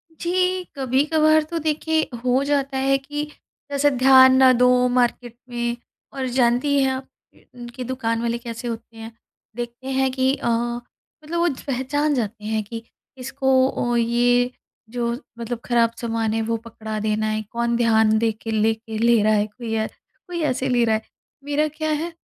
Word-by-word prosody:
जी, 365 +2 0
कभी-कभार 305 +4 +3
तो 330 +2 -4
देखिए 315 +1 0 0.2
हो 255 +2 +2
जाता 280 -1 0
है 270 +1 +2
कि 295 +2 -5 0.5
जैसे 285 +1 +3
ध्यान 260 0 +7
ना 260 -1 +7
दो 250 0 +4
मार्केट 245 -1 0
में 240 0 -2 0.4
और 270 -1 -3
जानती 250 +4 +3
हैं 265 - +2
आप 260 0 -5 0.7
कि 255 - -5
दुकान 230 -2 -2
वाले 235 0 -1
कैसे 235 0 -7
होते 230 0 -7
हैं, 225 +1 -8 0.4
देखते 240 +2 -6
हैं 265 0 +1
कि 260 0 +1
अ 265 - -5
अ, 240 +1 0 0.4
मतलब 335 +3 -3
वो 345 - +3 0.2
पहचान 290 +3 0
जाते 215 -3 -3
हैं 220 0 -1
कि 225 +2 -8 0.3
इसको 265 +1 -2 0.2
ओ 240 -2 -1
ये 245 +1 +2 0.4
जो 235 0 -2 0.3
मतलब 235 0 -4
ख़राब 235 -1 +2
सामान 225 -2 -1
है 225 - 0
वो 230 +1 -1
पकड़ा 220 -1 -7
देना 215 0 0
है, 215 0 -1
कौन 235 0 0
ध्यान 220 -2 +3
देके 225 0 -2
लेके 220 +1 -1
ले 235 0 +4
रहा 215 - +3
है 210 -1 +2
कोई 225 +1 -5
अ, 220 0 0 0.4
कोई 345 -2 -4
ऐसे 260 -2 0
ले 245 -1 +3
रहा 220 - +2
है। 220 - -2 0.4
मेरा 290 +1 0
क्या 310 +1 -4
है 320 +3 -2
245 Hz, 175 wpm, -22 LUFS, 230-270 Hz, 0.7 s, ध्यान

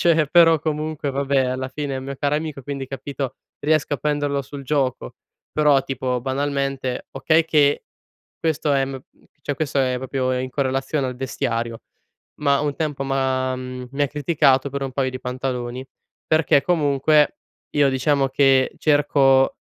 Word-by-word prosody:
Cioè 165 -3 +3
però 165 -1 +6
comunque 155 -1 -2
vabbè, 140 0 +1
alla 130 +1 -2
fine 145 0 -4
è - - -3
un 130 - -7
mio 140 0 -5
caro 145 +2 0
amico, 150 -3 -5
quindi 140 0 -5
capito, 135 0 -5 0.2
riesco 155 0 +1
a - - -2
prenderlo 145 -1 -1
sul 140 +1 -9
gioco, 135 -2 -1 0.4
però 150 -3 +4
tipo 130 -2 -2
banalmente, 135 -1 -2
okay 160 +4 +2
che 145 -3 +2 0.5
questo, 155 -2 0
ehm, 135 -1 -1 0.4
cioè 145 - -3
questo 145 -1 -2
è 130 -1 +1
proprio 130 -1 -1
in 130 0 -4
correlazione 135 +1 -1
al 125 - -4
vestiario, 115 -2 -2 0.6
ma 140 -1 +3
un 145 -1 -1
tempo, 150 -4 -2
m'ha 130 -1 0
mi 130 +1 -7
ha 145 - +3
criticato 145 -2 +2
per 140 +1 -4
un 135 -1 -4
paio 130 0 0
di 130 - -6
pantaloni, 125 0 -4 0.4
perché 155 -3 +3
comunque, 150 -2 +2 0.3
io 145 -1 +3
diciamo 135 +1 +1
che 135 -1 +3
cerco, 140 -3 +3
140 Hz, 155 wpm, -22 LUFS, 130-145 Hz, 0.6 s, però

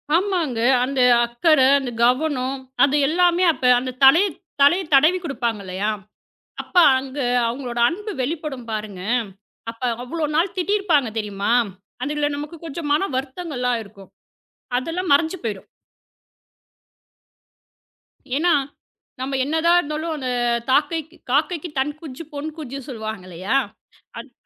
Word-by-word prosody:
ஆமாங்க. 345 - 0 0.2
அந்த 265 0 0 0.2
அக்கறை, 260 +3 +3
அந்த 255 -3 -5
கவனம், 265 0 0 0.3
அது 280 +1 +3
எல்லாமே 350 +2 +3
அப்ப - - -14 0.2
அந்தத் 255 +1 -7
தலைய 340 +9 +7 0.3
தலைய 345 +7 +5
தடவி 310 +7 +5
கொடுப்பாங்க 240 -8 -2
இல்லையா! 190 +3 -2 0.7
அப்போ 360 - +2 0.2
அங்க 265 +2 -5 0.3
அவுங்களோட 240 -1 -5
அன்பு 420 +5 -5
வெளிப்படும் 290 -4 -4
பாருங்க. 210 -4 -5 0.7
அப்ப 230 - -15 0.2
அவ்ளோ 310 +5 -3
நாள் 345 +3 +1
திட்டி 370 +3 -1
இருப்பாங்க 300 - +2
தெரியுமா? 205 +1 -2 0.5
அதுல 295 +1 -1
நமக்குக் 305 +3 -8
கொஞ்சம் 310 0 -5
மன 385 +7 +1
வருத்தங்கள்லாம் 260 -4 -2
இருக்கும். 200 -1 -16 0.7
அதெல்லாம் 330 +5 -2
மறைஞ்சு 320 +5 +2
போயிரும். 210 -4 -4 2.7
ஏன்னா, 340 +4 +3 0.7
நம்ம 270 +1 -2
என்னதான் 325 +3 +3
இருந்தாலும், 315 +1 -3
அந்தத் 240 -3 -1
தாக்கைக் 315 +2 +1 0.2
"காக்கைக்குத் 305 +1 -1
தன் 290 +2 0
குஞ்சு 305 0 -8
பொன் 290 +2 -4
குஞ்சு" 275 -3 -6
சொல்லுவாங்க 220 -5 -6
இல்லையா! 190 +10 -1 0.6
அத் - - -11
280 Hz, 120 wpm, -22 LUFS, 245-330 Hz, 2.7 s, தலைய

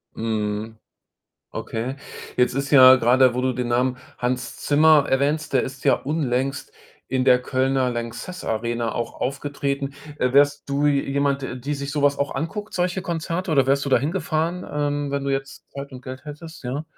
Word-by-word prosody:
Mhm, 110 0 -3 0.7
okay. 125 +5 -4 0.4
Jetzt 125 0 +2
ist 140 +1 -2
ja 130 -2 +9
grade 125 +1 +4
wo 125 - 0
du 130 - +1
den 125 -1 -3
Namen 125 +1 +1 0.2
Hans 125 0 -2
Zimmer 150 0 +5
erwähnst, 145 +3 0
der 130 - +3
ist 135 0 -7
ja - - +5
unlängst 135 -2 -2 0.3
in 130 0 0
der 125 -1 +5
Kölner 130 0 +1
LANXESS 120 +10 -5
Arena 115 +1 -1
auch 115 -1 -5
aufgetreten. 140 0 -2 0.2
Äh, 125 0 +1
wärst 145 +1 +3
du 140 +1 +1
je 140 -1 +3
jemand, 140 0 0
der 130 - -4
die 140 +4 -3
sich 140 0 -5
so 145 0 -2
was 145 0 +3
auch 140 - -1
anguckt, 165 +9 -4
solche 180 +1 0
Konzerte? 170 +1 -3
Oder 135 -4 +3
wärst 140 0 +2
du 140 - -2
da - - +5
hingefahren, 165 +2 -1
ähm, 145 -1 -1
wenn 140 0 -1
du 140 - -1
jetzt 135 0 -4
Zeit 140 0 -8
und 125 - -9
Geld 130 +2 -8
hättest, 150 +1 -10
ja? 135 +5 -3
140 Hz, 185 wpm, -23 LUFS, 125-145 Hz, 0.7 s, ja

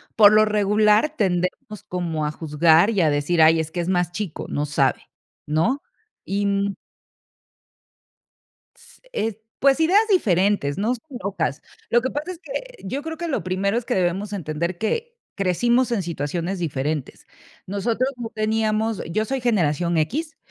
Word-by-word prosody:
por 210 -2 +8
lo 215 0 +6
regular 210 +6 +3
tendemos 195 +4 -1
como 170 -4 -2
a 150 - -1
juzgar 160 +4 +3
y 200 -4 +1
a 160 - +4
decir: 150 +4 +1
"Ay, 160 +1 +6
es 160 0 -3
que 175 - -4
es 170 - -2
más 175 -2 +1
chico, 180 -3 -5
no 145 - -1
sabe", 140 -3 +1 0.5
¿no? 165 - +1 0.4
Y, 200 +1 -1
mm 200 0 0 2.0
s 475 0 -20
eh, 225 - -2 0.2
pues 275 +2 +4
ideas 400 +7 +4
diferentes, 195 - +2
no 225 +5 +1
sé, 230 - -15 0.2
locas. 170 -7 -2 0.3
Lo 240 - +4
que 260 - -1
pasa 300 +7 -4
es 345 - -9
que - - -7
yo 265 +9 -3
creo 320 0 -5
que 340 0 -4
lo 285 - -2
primero 195 +4 0
es 240 - -1
que 250 - -1
debemos 190 +3 0
entender 170 -1 -3
que 465 - -2 0.2
crecimos 235 +6 +2
en 230 -4 +1
situaciones 170 +3 -3
diferentes. 150 -3 -3 0.4
Nosotros 225 +6 0
no 235 -2 -5
teníamos 220 0 0
Yo 215 +4 0
soy 265 +1 -2
generación 175 -7 +1
equis, 305 - -1
200 Hz, 160 wpm, -23 LUFS, 170-240 Hz, 2.0 s, por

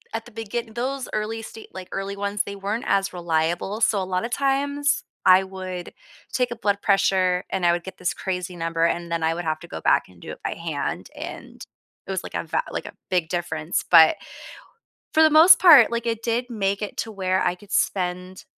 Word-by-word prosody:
at 225 - -3
the - - -14
begin 225 +1 -5
those 260 +2 -3
early 220 +1 -3
stage, 220 0 -11
like, 185 -1 -8
early 195 +1 -4
ones, 200 0 -1
they 200 0 -7
weren't 205 +4 -3
as 195 -1 +1
reliable, 175 +4 -1
so 205 -3 +3
a - - -2
lot 185 +2 -2
of 235 - -4
times 285 +1 0 0.2
I 185 +1 +7
would 185 -2 -7 0.4
take 250 -1 0
a 240 - -5
blood 205 -3 0
pressure 185 -2 +2
and 190 -2 -2
I 170 - +5
would 175 0 -2
get 190 - -9
this 180 - -1
crazy 180 -1 -4
number, 165 0 -1
and 170 0 -2
then 165 - -1
I 160 +1 +1
would 175 - -5
have 155 -1 -2
to - - -12
go 80 - -7
back - - +3
and 90 -2 -19
do - - -8
it - - -12
by - - -3
hand, - - -4
and - - -9 0.4
it - - -8
was, - - -2
like, - - -9
a - - -2
va - - -1
like - - -4
a - - -10 0.2
big 180 -3 +1
difference. 170 -2 -2
But 160 - +8 1.0
for 315 - +5
the - - +7
most 315 +4 +8
part, 335 -9 +8
like, 235 0 -3
it 230 -1 -2
did 240 +2 -1
make 200 -3 -1
it 205 - -5
to 225 - -3
where 190 -2 0
I 175 0 0
could 205 +2 -15
spend 180 0 -1
195 Hz, 225 wpm, -23 LUFS, 180-225 Hz, 1.0 s, But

